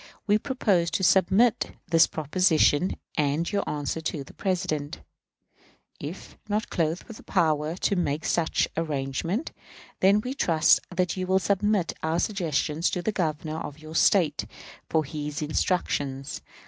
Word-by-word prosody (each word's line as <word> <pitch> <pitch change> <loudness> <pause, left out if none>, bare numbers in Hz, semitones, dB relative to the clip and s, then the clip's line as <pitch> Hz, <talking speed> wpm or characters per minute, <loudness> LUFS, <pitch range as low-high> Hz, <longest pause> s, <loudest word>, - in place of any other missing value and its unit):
We 210 0 +3
propose 205 -10 +1
to 190 - -4
submit 190 +6 +3 0.2
this 165 -1 +6
proposition 160 +1 +2 0.2
and 150 +4 +1
your 205 - 0
answer 150 +2 -3
to 155 -2 -3
the - - -15
President. 155 -6 -2 1.0
If - - -8
not 215 +2 -1
clothed 165 0 0
with 225 - -12
power 155 -3 +1
to 200 - 0
make 155 -4 -1
such 165 -2 +1
arrangement, 160 - -2 0.5
then 195 +2 +5
we 250 +4 -4
trust 165 - +4
that 180 0 -1
you 185 0 -2
will 190 0 +3
submit 200 -1 +1
our 160 +1 0
suggestions 165 -4 0
to 180 - -3
the 220 - 0
Governor 160 -4 -2
of 145 - -7
your 155 0 -11
State 160 -3 +3 0.4
for 160 -1 +2
his 150 0 -5
instructions. 145 -4 -1
165 Hz, 140 wpm, -26 LUFS, 155-190 Hz, 1.0 s, this